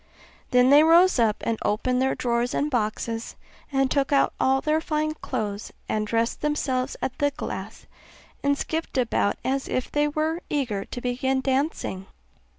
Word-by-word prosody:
Then 250 +1 +5
they 290 +1 +8
rose 335 0 +5
up 220 -3 +3
and 225 -1 -1
opened 250 +4 0
their 265 - +1
drawers 240 0 0
and 295 +1 0
boxes, 225 -1 -2 0.4
and 270 -1 +1
took 280 0 +1
out 280 - +3
all 265 0 +3
their 310 +3 +1
fine 310 -1 -1
clothes, 215 -8 -4 0.2
and 215 0 -1
dressed 230 +2 0
themselves 265 -4 -1
at 260 - -3
the 285 - +3
glass, 280 - -7 0.6
and 280 0 +2
skipped 320 -2 -3
about 230 -4 +1
as 270 +1 -1
if 255 - -2
they 295 0 +2
were 310 +3 -1
eager 235 -9 -1
to 245 - -7
begin 255 +2 0
dancing. 265 -8 -1
265 Hz, 160 wpm, -25 LUFS, 235-295 Hz, 0.6 s, they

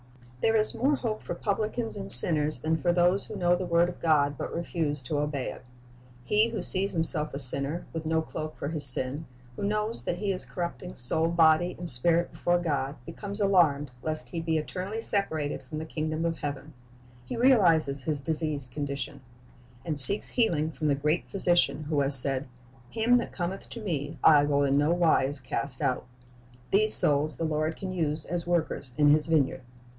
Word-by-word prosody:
There 225 - +1
is 215 -1 +1
more 265 +6 0
hope 225 -5 -5
for - - -6
publicans 220 +3 -4
and 100 0 -3
sinners 150 +5 +6
than 160 +1 -1
for 175 - +1
those 175 +3 +1
who - - -9
know 175 0 +1
the 180 0 -5
word 170 0 +2
of 175 - -9
God 145 -3 +1
but - - -5
refuse 160 -4 -4
to 145 +4 -3
obey 145 -3 -4
it. - - -13 0.6
He 210 - +1
who 220 -5 -5
sees 195 +2 -3
himself 160 -3 -3
a - - -4
sinner, 140 +4 +5
with 160 -1 -6
no 160 0 0
cloak 155 0 -8
for 140 - -5
his 155 -2 -3
sin, 135 +3 +8 0.3
who - - -7
knows 210 +2 -2
that 175 - -3
he 200 +1 -3
is 185 - -4
corrupting 180 0 -7
soul, 160 +7 0
body, 170 +1 +2
and 175 - -7
spirit 170 +6 0
before 175 0 -1
God, 145 -5 -3
becomes 200 0 -7
alarmed 165 -9 +1
lest 155 -6 -5
he 165 - -5
be 160 -1 -1
eternally 190 +7 -5
separated 160 -10 -1
from 155 - -9
the 155 - -6
kingdom 155 +1 -4
of 165 -1 -3
heaven. 145 +1 -7 0.5
He 125 - -7
realizes 170 - +2
his 145 0 -4
diseased 150 -4 -4
condition, 140 0 -6 0.6
and 155 -4 0
seeks 200 +9 +8
healing 165 -10 -1
from 155 +2 -4
the 145 - +1
great 150 +4 -2
Physician 175 -5 0
who 150 0 -2
has 140 0 +6
said, 135 +1 +5 0.4
"Him 235 - +1
that 240 - -6
cometh 185 +2 -6
to 230 - -8
Me, 150 -5 -5
I 145 -2 +5
will 145 -1 0
in 140 0 +1
no 145 +2 +1
wise 155 -5 0
cast 130 0 -6
out."' 125 -1 -2 0.6
These 215 +2 +5
souls 150 0 +2
the - - -4
Lord 155 +1 -2
can 190 -1 -7
use 155 -4 -3
as 175 0 -4
workers 160 -7 -3
in 145 -1 +4
His 150 +1 +1
vineyard. 140 -5 0
160 Hz, 190 wpm, -26 LUFS, 145-180 Hz, 0.6 s, sin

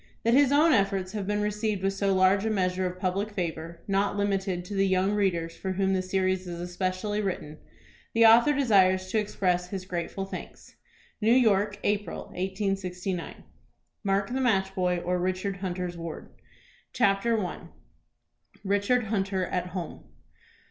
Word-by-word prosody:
That 230 - +3
his 280 +1 +5
own 305 +3 +5
efforts 195 -3 +1
have 205 -3 -4
been 210 0 0
received 210 -1 -1
with 195 0 +1
so 195 0 0
large 190 +1 +4
a 220 - 0
measure 185 -3 0
of 180 0 -6
public 195 +3 -1
favor, 170 -4 -5
not 200 +1 +1
limited 195 -3 -1
to 205 - -7
the 195 0 +2
young 190 +1 +2
readers 170 -5 0
for 190 -1 -3
whom 195 0 +1
the 190 - +1
series 185 0 -1
is 170 -1 -5
especially 185 +4 -2
written, 155 -6 -4 0.6
the 230 0 +6
author 230 +5 +7
desires 190 -9 +3
to 220 - +2
express 180 -4 0
his 190 -1 -5
grateful 180 +2 -4
thanks. 195 - -9 0.5
NEW 220 +2 +4
YORK, 205 -4 +3
April, 205 0 -1
1869. 190 -1 -3 0.6
MARK, 195 0 +1
THE 265 +1 -1
MATCH 195 -6 +1
BOY; 180 -2 0
OR, 180 +1 -1
RICHARD 185 +2 -2
HUNTER'S 180 -2 -4
WARD. 165 -1 -7 0.6
CHAPTER 225 +1 +2
I. - - -5 1.0
RICHARD 205 +5 +1
HUNTER 195 -3 -1
AT 180 0 -2
HOME. 180 -1 -6
195 Hz, 155 wpm, -27 LUFS, 185-205 Hz, 1.0 s, author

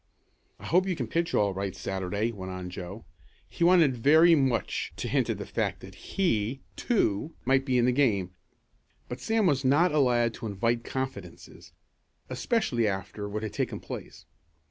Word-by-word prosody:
"I - - -11
hope 185 +3 +2
you 185 - 0
can 130 - -3
pitch 165 +9 -1
all 100 -2 +2
right 95 0 -4
Saturday," 95 +4 -2
went 95 -4 -7
on 90 -1 -6
Joe. 95 +4 -8 0.4
He - - -3
wanted 170 -6 +5
very 155 +8 +6
much 130 - 0
to - - -4
hint - - +1
at - - -1
the - - -6
fact - - -2
that - - -11
he, 130 - -1
too, 160 - 0
might 135 +1 +3
be 130 -1 +2
in 120 - +3
the 125 - +3
game, 110 -9 +1 0.8
but 125 - -6
Sam 220 - +1
was 145 -6 +2
not 145 +7 +4
a 150 - +2
lad 120 -3 +2
to 110 - -6
invite 115 +4 -1
confidences, 115 -11 -7 0.6
especially 120 - 0
after 100 +1 -4
what 105 +1 -4
had 110 - -4
taken - - -2
place. - - -9
120 Hz, 175 wpm, -28 LUFS, 100-145 Hz, 0.8 s, very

